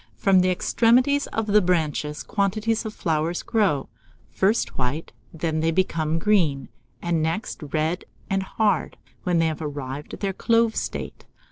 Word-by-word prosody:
From 195 -2 +4
the 185 0 +3
extremities 250 +9 +3
of 225 - -2
the 210 0 +4
branches 155 -4 0
quantities 215 +3 0
of 215 - -6
flowers 165 +1 -1
grow, 195 - +1 0.4
first 205 +4 +1
white; 130 +5 -2 0.2
then 160 0 -2
they 160 +1 +2
become 165 -2 +1
green, 165 -7 +2 0.3
and 170 -2 +1
next 165 +8 -2
red 160 +3 -1 0.2
and 195 -2 0
hard, 200 -1 0 0.3
when 180 -1 +2
they 165 - +3
have 160 0 -2
arrived 145 -1 -5
at - - -15
their 195 -2 -1
clove 230 +2 +2
state. - - -5
180 Hz, 150 wpm, -24 LUFS, 155-210 Hz, 0.4 s, From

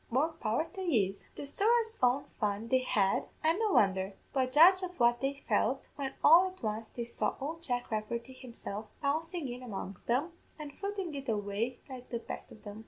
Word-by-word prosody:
more 270 +7 +2
power 240 -2 -1
to 385 - -6
yez!' 210 - +1
"The - - -6
sorra's 450 +9 +2
own 255 +3 +3
fun 210 +1 -1
they 260 - +4
had, 205 -6 +1 0.2
an' 325 +5 +3
no 435 -3 +1
wondher; 190 -1 +3 0.2
but 260 -2 +1
judge 355 +7 +7
of 360 -3 -6
what 240 0 +4
they 270 +1 0
felt, 245 +4 +1
when 270 -2 -4
all 340 +5 +8
at 370 -5 -11
once 220 +1 -2
they 240 - -5
saw 235 - -2
ould 320 +4 -4
Jack 245 -6 -2
Rafferty 235 +4 -3
himself 230 -4 -7 0.2
bouncin' 315 +2 -1
in 245 0 -6
among 195 -5 -6
them, 270 +9 +1 0.3
and 295 -2 -7
footing 395 -3 -4
it 275 -2 -5
away 210 +3 -2
like 255 -2 -9
the 235 - -2
best 230 - -8
o' - - -10
them. 210 -1 -10
255 Hz, 195 wpm, -32 LUFS, 220-320 Hz, 0.3 s, all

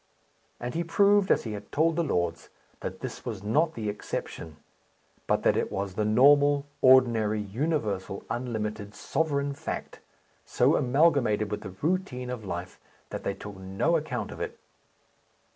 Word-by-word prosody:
And 120 0 -4
he 170 - -1
proved, 200 +3 +4
as - - +3
he 110 - -5
had 105 0 -8
told 160 +2 +2
the 170 - +1
lords, 85 - -1 0.3
that - - -6
this - - -6
was 105 -5 -5
not 155 +10 +1
the 110 -2 -4
exception; 80 -6 -5 0.7
but - - +1
that - - +4
it - - -1
was 95 -1 -3
the 105 - -1
normal, 140 +5 +5 0.2
ordinary, 115 -5 +5
universal, 105 - -2
unlimited, 110 -4 -4
sovereign 140 -1 -1
fact, 140 - -6 0.4
so - - +2
amalgamated 125 -6 +2
with 105 - -3
the 95 -3 -8
routine 150 -8 -1
of 120 -3 -5
life 90 -1 -6 0.3
that - - -5
they 100 - -2
took 105 -1 -9
no 95 - 0
account 155 -1 -2
of - - -8
it. - - -4
120 Hz, 155 wpm, -28 LUFS, 105-145 Hz, 0.7 s, normal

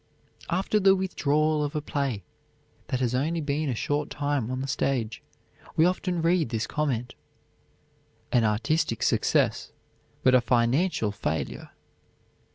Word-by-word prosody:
After 190 +4 +1
the 195 -1 +5
withdrawal 155 -5 +1
of 145 +1 -3
a - - +1
play 140 -8 -2 0.6
that 130 - -2
has 120 -2 +1
been 145 +7 0
only 150 0 -1
a 125 - -1
short 145 +5 -1
time 145 -5 -1
on 130 0 -3
the 135 - -3
stage, 125 -5 -1 0.5
we 160 - +5
often 180 -1 0
read 165 -5 +2
this 115 -1 -1
comment, 130 -5 -2 1.2
"An 120 - +3
artistic 115 +4 0
success, - - +1 0.5
but 130 - +5
a 130 - +6
financial 120 - +1
failure." 80 -6 -3
140 Hz, 135 wpm, -27 LUFS, 120-160 Hz, 1.2 s, a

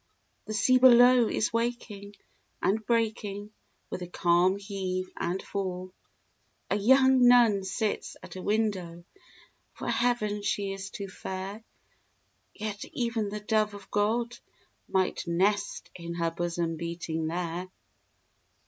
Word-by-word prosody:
The 215 - -4
sea 255 +3 +4
below 245 -1 +7
is 220 - -1
waking 230 -4 -3 0.4
and 215 +3 +1
breaking 215 -2 -1 0.4
With - - -4
a 180 - -5
calm 175 +2 +3
heave 190 -2 -4
and 175 +2 -2
fall. 185 -2 -4 0.8
A - - +3
young 260 +4 +5
nun 235 -5 +5
sits 210 +3 -2
at - - -10
a 185 - -6
window; 190 -5 -1 0.7
For - - -6
Heaven 215 -4 0
she 200 -1 -1
is 195 0 -6
too 200 0 -6
fair; 190 +3 -6 0.9
Yet 210 -1 -5
even 230 -4 -2
the 210 +1 -5
dove 215 0 +1
of 200 -1 -13
God 230 +3 0 0.5
might 185 -2 0
nest 200 +4 0
In 170 -1 -7
her 170 -1 0
bosom 170 -1 -2
beating 165 -1 -3
there. 175 +1 -3
200 Hz, 125 wpm, -28 LUFS, 185-220 Hz, 0.9 s, below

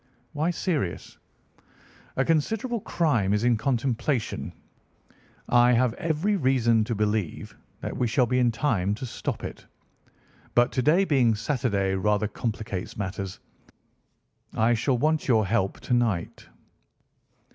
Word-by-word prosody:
"Why 155 +3 0
serious?" 160 - -3 1.0
"A 135 - +1
considerable 220 - 0
crime 120 - +1
is 105 - -1
in 120 -1 +4
contemplation. 125 +1 -1 1.0
I 120 0 +5
have 120 -1 +2
every 165 - 0
reason 120 - +3
to 115 - -2
believe 105 -4 -2 0.3
that - - -4
we 125 - 0
shall 125 +2 +2
be 125 +2 +1
in 125 -1 +4
time 110 -5 0
to 120 - -6
stop 120 - -5
it. - - -8 0.9
But 120 0 +4
to 130 - 0
day 165 +9 +4
being 130 - +3
Saturday 105 -5 0
rather 105 +2 +1
complicates 105 -3 -4
matters. 95 -1 -4 1.2
I 115 +2 +3
shall 120 +3 +1
want 155 +4 +1
your 110 -5 +3
help 95 -1 0
to 125 - -2
night." 115 -8 -1
120 Hz, 130 wpm, -26 LUFS, 105-140 Hz, 1.2 s, I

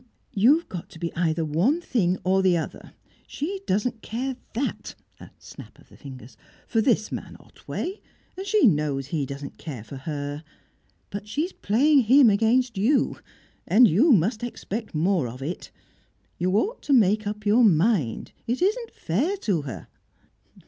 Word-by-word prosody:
"You've 275 - +4
got 175 -3 -7
to 165 - -13
be 170 0 -4
either 165 -1 0
one 180 - +1
thing 190 - 0
or 190 +1 +2
the 185 -2 +3
other. 160 - -6 0.3
She 380 +7 -4
doesn't 220 +3 -1
care 255 +4 -3 0.2
that" 270 +4 -3 0.2
a - - -12
snap - - -13
of - - -21
the - - -17
fingers 130 -4 -12 0.3
"for 225 - +1
this 220 -2 +1
man - - -7
Otway, 385 +4 -7 0.3
and 380 - -6
she 425 -4 +4
knows 150 - +1
he 140 -1 -2
doesn't 140 +1 -8
care 135 -9 -7
for 135 +4 -9
her. 145 +1 -5 0.7
But 200 +1 -6
she's 300 - -2
playing 265 +5 +3
him 255 0 +6
against 230 +2 +2
you, 255 +8 +2 0.5
and 240 +3 +6
you 225 - +4
must 215 +2 +2
expect 225 -4 -5
more 170 -2 +1
of 125 +3 -8
it. 165 +6 -5 0.7
You 180 +1 +1
ought 440 - -1
to 285 - 0
make 215 -3 +3
up 210 0 -5
your 220 +4 +4
mind. 175 - +2 0.2
It 240 +3 -1
isn't 440 +5 0
fair 285 - -1
to 200 - -1
her." 135 -5 -8
210 Hz, 160 wpm, -25 LUFS, 160-255 Hz, 0.7 s, him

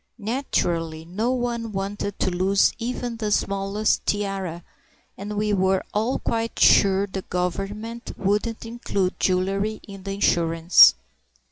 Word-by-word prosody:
Naturally 170 - -2
no 210 +8 -1
one 240 -3 -2
wanted 200 +1 -4
to 185 - 0
lose 190 +2 +2
even 240 0 -4
the 215 -2 -2
smallest 200 +1 0
tiara, 195 -4 -2 0.5
and 205 +1 -6
we 210 0 0
were 190 -1 +2
all 220 +5 0
quite 230 -1 -3
sure 195 0 +5
the 190 -1 -5
Government 195 +7 -4
wouldn't 210 +4 -1
include 200 -5 -2
jewellery 195 +3 0
in 195 -1 -10
the 195 +1 -5
insurance. 165 -3 +5
200 Hz, 125 wpm, -23 LUFS, 190-220 Hz, 0.5 s, sure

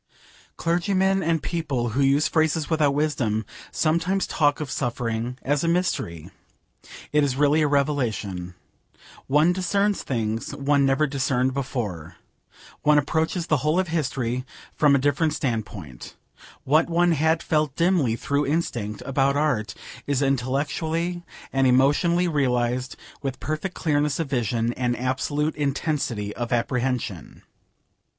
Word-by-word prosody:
Clergymen 190 +3 +1
and 165 -2 0
people 140 -8 -2
who 130 +6 -1
use 140 +2 +3
phrases 160 0 +1
without 150 -3 +2
wisdom 120 -8 0 0.3
sometimes 170 +4 +1
talk 145 -2 +1
of 150 -4 -4
suffering 120 -1 -2
as 145 +2 0
a - - 0
mystery. 165 - -1 0.8
It 150 0 +3
is 135 -3 0
really 145 +2 +3
a 150 - +3
revelation. 115 -11 -1 0.7
One 150 +6 +4
discerns 200 +3 0
things 115 -3 -3
one 140 0 +2
never 135 +3 +3
discerned 130 -2 0
before. 110 - -4 0.7
One 150 0 +4
approaches 160 +4 0
the 155 - +2
whole 150 +6 +1
of 185 -2 -1
history 130 -6 -1 0.3
from 145 -2 +4
a - - +5
different 145 +3 +1
standpoint. 100 - -4 0.5
What 155 +5 +3
one 175 +1 +3
had 160 +1 +2
felt 150 -3 0
dimly, 165 -9 +2
through 140 +4 -1
instinct, 120 -9 -2
about 135 +1 +1
art, 120 -10 0 0.3
is 140 -1 +1
intellectually 145 +6 -1 0.3
and 135 0 +3
emotionally 145 +8 +3
realised 125 -4 0 0.3
with 135 -2 -4
perfect 155 +5 -3
clearness 150 -2 0
of 160 -4 -3
vision 120 -2 0
and 120 -1 -1
absolute 145 +4 -1
intensity 140 -7 -2
of 120 0 -4
apprehension. 120 -6 -2
140 Hz, 130 wpm, -24 LUFS, 125-160 Hz, 0.8 s, a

